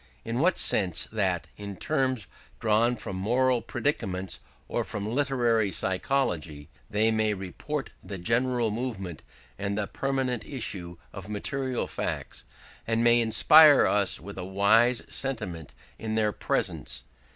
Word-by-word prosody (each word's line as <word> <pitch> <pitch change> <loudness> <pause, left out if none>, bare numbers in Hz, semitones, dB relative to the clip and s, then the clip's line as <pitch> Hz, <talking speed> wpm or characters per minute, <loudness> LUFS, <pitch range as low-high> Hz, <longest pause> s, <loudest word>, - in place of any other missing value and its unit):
In 115 +1 -2
the 175 +6 +4
sense 90 -5 +2
that, 95 -5 0
in 100 -1 -7
terms 130 -4 0 0.3
drawn 115 +2 +2
from 95 -4 -6
moral 125 +5 +2
predicaments 95 - -2 0.3
or - - -1
from 105 -1 -5
literary 120 -4 +1
psychology, 90 - -1 0.2
they 110 +2 +2
may 110 -1 +1
report 115 +10 -5
the 100 - -7
general 115 +4 +1
movement 105 -8 -4 0.4
and 100 0 -2
the 105 - 0
pertinent 130 -1 -2
issue 90 -10 -4 0.2
of 95 +1 -9
material 130 +5 -2
facts, - - -4 0.4
and 115 0 +1
may 120 0 +5
inspire 145 +7 +7
us 100 -2 +2
with 100 +5 -9
a - - -4
wise 110 +6 +3
sentiment 105 - -3 0.2
in 110 -1 -3
their 110 -1 +2
presence. - - -2
110 Hz, 130 wpm, -27 LUFS, 95-125 Hz, 0.4 s, inspire